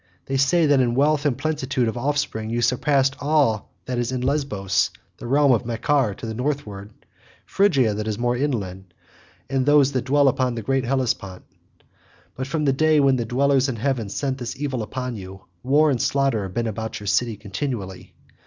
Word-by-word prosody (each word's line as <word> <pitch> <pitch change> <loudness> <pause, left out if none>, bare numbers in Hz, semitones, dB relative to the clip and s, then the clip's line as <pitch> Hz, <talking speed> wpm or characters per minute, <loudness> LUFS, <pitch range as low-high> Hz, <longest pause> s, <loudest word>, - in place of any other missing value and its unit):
They 135 - -1
say 160 +5 +3
that 145 -2 +4
in 120 -2 +1
wealth 145 +2 +2
and 130 -4 -1
plenitude 135 -4 -1
of 110 - -2
offspring 135 -4 -2
you 120 +1 -1
surpassed 135 +2 +2
all 140 -8 +1 0.2
that 125 -1 -3
is 120 +1 -1
in 130 -1 -2
Lesbos, 125 -9 0 0.3
the - - -8
realm 140 +2 +4
of 115 - +2
Makar 120 -1 0
to - - -8
the 110 - -4
northward, 110 -6 -4 0.6
Phrygia 140 - +2
that 105 +1 -4
is 105 -2 -2
more 120 +1 0
inland, 95 -9 -3 0.5
and 135 -1 0
those 145 -2 +5
that 130 -3 -2
dwell 140 +1 +3
upon 130 -2 +1
the 115 - -5
great 135 +3 0
Hellespont; 120 -7 -2 0.9
but 130 0 -5
from 150 +2 -1
the 135 - +3
day 155 +2 +3
when 135 -2 +4
the 120 - -2
dwellers 135 +3 +2
in 130 - -2
heaven 115 -2 -1
sent 135 +4 -3
this 120 +1 -6
evil 135 -4 -2
upon 125 +2 -4
you, 95 0 -10 0.2
war 145 +4 +3
and 125 - 0
slaughter 135 -5 +1
have 95 -2 -7
been 120 - 0
about 110 0 -4
your 105 - -10
city 105 +3 0
continually. 100 -2 -5
130 Hz, 190 wpm, -23 LUFS, 110-140 Hz, 0.9 s, those